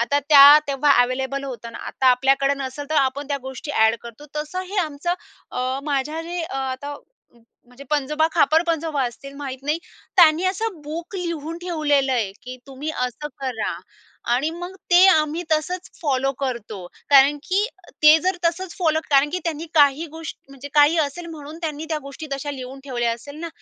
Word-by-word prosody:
आता 280 +5 +2
त्या 290 0 +10
तेव्हा 280 +1 +3
ॲव्हेलेबल 265 +2 -1
होतं 235 -3 -7
ना, - - -8
आता 265 - -1
आपल्याकडे 270 +2 +3
नसेल 275 +1 -5
तर - - 0
आपण 280 0 +1
त्या 285 - 0
गोष्टी 265 +3 -7
ॲड 220 -4 +3
करतो. 235 +4 -11
तसं 300 +4 -4
हे 410 - -5
आमचं 315 +1 -2 0.4
अ, 255 +1 -2
माझ्या 295 +2 -1
जे 345 +1 -4
आता 270 +2 -4 0.7
म्हणजे 250 +3 -14
पंजोबा, 300 +2 +1
खापर-पणजोबा 320 -1 +2
असतील, 275 +4 -9
माहीत 270 -2 -6
नाही, 300 +3 0 0.4
त्यांनी 335 -1 +6
असं 380 -1 -2
बुक 325 +6 -7
लिहून 335 -2 -4
ठेवलेलं 295 -6 +1
आहे, 220 -6 0
की 255 +1 -8
तुम्ही 275 +3 -5
असं 250 +4 -3
करा. 250 -6 -2 0.6
आणि 265 +6 +1
मग 355 +3 -7 0.2
ते 355 +1 +7
आम्ही 315 -1 +2
तसंच 355 +4 -1
फॉलो 270 -4 +1
करतो, 225 -8 -4 0.2
कारण 280 +1 +7
की 390 +3 +2 0.4
ते 305 +1 +8
जर 370 0 +1
तसंच 340 +2 -1
फॉलो 315 -3 +2
कारण 280 +1 +4
की 365 - 0
त्यांनी 330 -1 -3
काही 290 +1 +4
गोष 320 0 -7 0.2
म्हणजे 275 0 -10
काही 295 +2 +5
असेल 315 +3 -2
म्हणून 310 -1 -9
त्यांनी 310 -1 -3
त्या 310 - 0
गोष्टी 280 +3 -8
तशा 275 +1 -3
लिहून 265 -1 -8
ठेवल्या 240 -4 -1
असेल 285 +5 -9
ना? 335 - -4
290 Hz, 175 wpm, -22 LUFS, 265-320 Hz, 0.7 s, त्या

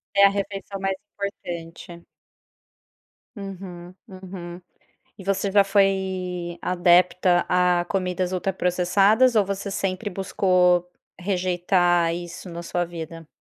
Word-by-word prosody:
É 200 0 +7
a - - +7
refeição 195 0 -4
mais 195 0 0 0.2
importante. 170 -3 -7 1.3
Uhum, 185 -3 -8
uhum. 185 -2 -9 0.6
E 200 - -11
você 195 0 0
já 200 0 +6
foi 190 -3 0
adepta 180 0 +3
a 180 -1 +3
comidas 185 -1 -1
ultraprocessadas 195 +6 +2
ou 210 - +5
você 200 +1 -4
sempre 195 +2 -2
buscou 180 -2 +2 0.3
rejeitar 180 -2 +1
isso 175 +1 -7
na 170 0 -6
sua 175 +1 -1
vida? 165 -1 -8
180 Hz, 105 wpm, -24 LUFS, 175-195 Hz, 1.3 s, É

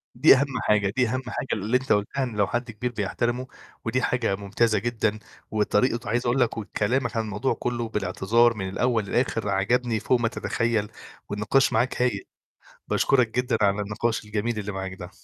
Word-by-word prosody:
دي 135 +3 +7
أهم 135 -2 -1
حاجة، 105 -2 +2
دي 125 -3 +3
أهم 130 +3 -1
حاجة - - -4
اللي 110 +5 +1
أنت 130 +1 -5
قُلتها، 105 +7 0
إن 120 -4 -4
لو 100 -2 +2
حد 120 -1 -2
كبير 120 +3 -3
بيحترمه، 120 +4 -2 0.4
ودي 125 +3 0
حاجة 120 -6 0
ممتازة 105 +2 +1
جدًا، 110 -1 -1 0.3
وطريقة 110 +3 +2
وعايز 120 +4 -1
أقول 120 +2 +2
لك 120 -3 +1
وكلامك 120 +3 -1
عن 110 - +1
الموضوع 110 +5 -1
كلّه، 120 -2 -3
بالاعتذار 110 +3 +2
من 95 -2 -3
الأول 115 +1 0
للآخر، 115 -2 0
عجبني 110 +3 +1
فوق 125 +3 +2
ما 115 - +1
تتخيل، 115 -2 -1 0.4
والنقاش 105 +6 +2
معاك 120 +3 +1
هايل. 125 -1 0 0.6
باشكرك 125 -4 +3
جدًا 125 +1 +1
على 100 0 +3
النقاش 110 +2 -2
الجميل 105 +2 -2
اللي 105 0 -4
معاك 95 -1 -5
ده. 90 0 -9
115 Hz, 175 wpm, -25 LUFS, 105-125 Hz, 0.6 s, دي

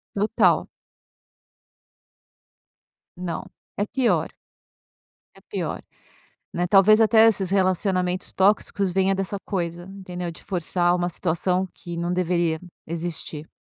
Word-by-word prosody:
Total. 205 +2 +2 2.5
Não, 175 -1 -5 0.3
é 205 - +1
pior. 230 - +1 1.0
É - - -17
pior, - - -4 0.7
né, 175 +1 -1
talvez 200 +4 +6
até 225 0 +6
esses 195 -4 +2
relacionamentos 185 -1 0
tóxicos 195 -1 +1
venha 190 +1 +2
dessa 195 +1 -2
coisa, 175 -2 -3
entendeu? 185 -2 -7
De - - -14
forçar 175 -1 +1
uma 175 0 -1
situação 180 +2 -1
que 170 -1 -8
não 170 +1 -2
deveria 175 -3 0 0.2
existir. 165 -2 -5
180 Hz, 105 wpm, -24 LUFS, 175-195 Hz, 2.5 s, talvez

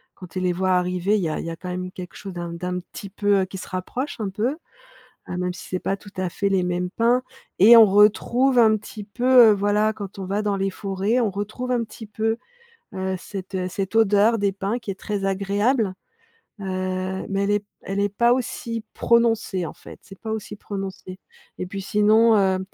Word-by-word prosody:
quand 185 - -10
tu 185 - -5
les 180 -1 +1
vois 185 +1 0
arriver 180 +2 +1
il - - -1
y 165 - 0
a 155 - -3
il - - -5
y - - -3
a - - -5
quand 180 +2 -8
même 180 0 -4
quelque 180 -3 -9
chose 195 -2 -8
d'un 175 -1 -5
d'un 180 +1 -3
petit 195 +2 -10
peu, 205 -1 +2
heu, - - 0
qui 190 +1 -8
se - - -8
rapproche, 235 +10 -4
un 210 -3 -2
peu. 210 +5 -1 0.8
Heu, 180 - -3
même 180 0 -1
si - - -10
c'est 185 - -2
pas 195 - -2
tout 200 0 -14
à 185 -1 -1
fait 200 +3 -1
les 190 -1 +2
mêmes 180 0 -1
pins 240 +4 +2 0.4
et 220 +6 +9
on 225 - +10
retrouve 230 +6 +4
un 220 -2 +5
petit 210 0 -9
peu, 245 +3 +5
heu, - - +5
voilà 205 +2 +1
quand 200 -2 -8
on 190 - -4
va 200 +3 -1
dans 205 -1 0
les 195 0 0
forêts, 195 +4 -1
on 225 -4 +1
retrouve 215 +6 -4
un 240 -2 +1
petit 225 0 -10
peu, 220 +2 -1 0.6
heu 190 0 -2
cette, 190 +1 -8
heu, 185 -1 -1
cette 190 +2 -4
odeur 220 +1 +4
des 200 -1 +1
pins 200 +4 -2
qui 235 - -7
est - - -3
très 205 -1 -3
agréable. 200 +3 +1 0.7
Heu, 185 0 -3
mais 195 0 0
elle 200 - +1
est 205 - +3
p 210 - -27 0.2
elle 195 +1 -2
est 200 - +2
pas 235 +4 +2
aussi 235 -2 -3
prononcée, 225 -6 +2
en - - -6
fait. - - -13
C'est 195 - -13
pas 220 - -5
aussi 215 -1 -5
prononcé. 195 -2 -7 0.4
Et - - -3
puis 195 +2 -6
sinon, 215 +3 +4
heu, 190 -2 +2
200 Hz, 225 wpm, -23 LUFS, 185-220 Hz, 0.8 s, on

